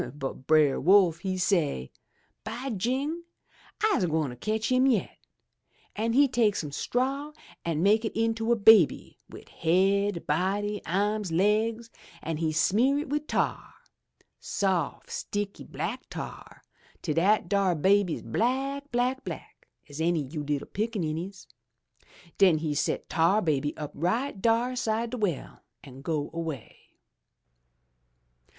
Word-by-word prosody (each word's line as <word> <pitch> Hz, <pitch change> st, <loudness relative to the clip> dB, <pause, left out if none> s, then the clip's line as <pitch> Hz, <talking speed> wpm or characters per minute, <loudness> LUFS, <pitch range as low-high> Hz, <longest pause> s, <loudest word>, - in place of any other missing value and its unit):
But 135 Hz, -2 st, -6 dB
Brer 155 Hz, -3 st, +4 dB
Wolf 180 Hz, -1 st, +5 dB
he 185 Hz, +1 st, -3 dB
say, 165 Hz, -, 0 dB, 0.5 s
*By 245 Hz, +5 st, -5 dB
jing! 265 Hz, -, -1 dB, 0.6 s
I'se 415 Hz, -, +3 dB
gwine 155 Hz, -6 st, -1 dB
cotch 220 Hz, -, -2 dB
him 255 Hz, +1 st, +4 dB
yet!' 230 Hz, -8 st, 0 dB, 0.8 s
An' 225 Hz, +2 st, -1 dB
he 280 Hz, +3 st, +5 dB
take 230 Hz, -5 st, +2 dB
some 150 Hz, -3 st, -4 dB
straw 270 Hz, -, -2 dB, 0.3 s
an' 165 Hz, -1 st, -1 dB
make 215 Hz, +3 st, +4 dB
it 220 Hz, -, -3 dB
into 225 Hz, 0 st, 0 dB
a -, -, +5 dB
baby 215 Hz, -6 st, +5 dB
wid -, -, -12 dB
haid, 195 Hz, +2 st, +1 dB
body, 200 Hz, +6 st, -1 dB
ahms, 205 Hz, +1 st, 0 dB
laigs; 220 Hz, +6 st, +1 dB, 0.3 s
an' 160 Hz, 0 st, -3 dB
he 160 Hz, 0 st, 0 dB
smear 225 Hz, -, +2 dB
it 295 Hz, -1 st, -3 dB
wid 300 Hz, +1 st, -2 dB
tar -, -, -2 dB, 0.4 s
— -, -, -35 dB, 0.2 s
soft, 185 Hz, -7 st, -2 dB
sticky 205 Hz, -1 st, -4 dB
black -, -, -5 dB
tar, -, -, -8 dB, 0.4 s
till 155 Hz, -, -1 dB
dat 185 Hz, +4 st, +2 dB
dar 195 Hz, -1 st, +2 dB
baby's 190 Hz, +1 st, +2 dB
black, 275 Hz, +4 st, -1 dB
black, 250 Hz, +2 st, 0 dB
black -, -, -9 dB, 0.2 s
as 145 Hz, +1 st, -7 dB
any 165 Hz, -2 st, +1 dB
you 150 Hz, +3 st, -6 dB
little 145 Hz, -1 st, -2 dB
pickaninnies! 190 Hz, -4 st, -3 dB, 0.9 s
Den 185 Hz, -5 st, +6 dB
he 155 Hz, -1 st, -2 dB
set 145 Hz, -, -1 dB
Tar 170 Hz, +6 st, +3 dB
Baby 145 Hz, -3 st, 0 dB
up 150 Hz, -2 st, -5 dB
right 200 Hz, -, -1 dB
dar 235 Hz, +3 st, +2 dB
'side 230 Hz, -1 st, -1 dB
de 250 Hz, -, -3 dB
well 200 Hz, -, -3 dB, 0.2 s
an' 135 Hz, -1 st, -12 dB
go 150 Hz, -1 st, -2 dB
'way. 160 Hz, -7 st, -5 dB
200 Hz, 135 wpm, -27 LUFS, 160-230 Hz, 0.9 s, Den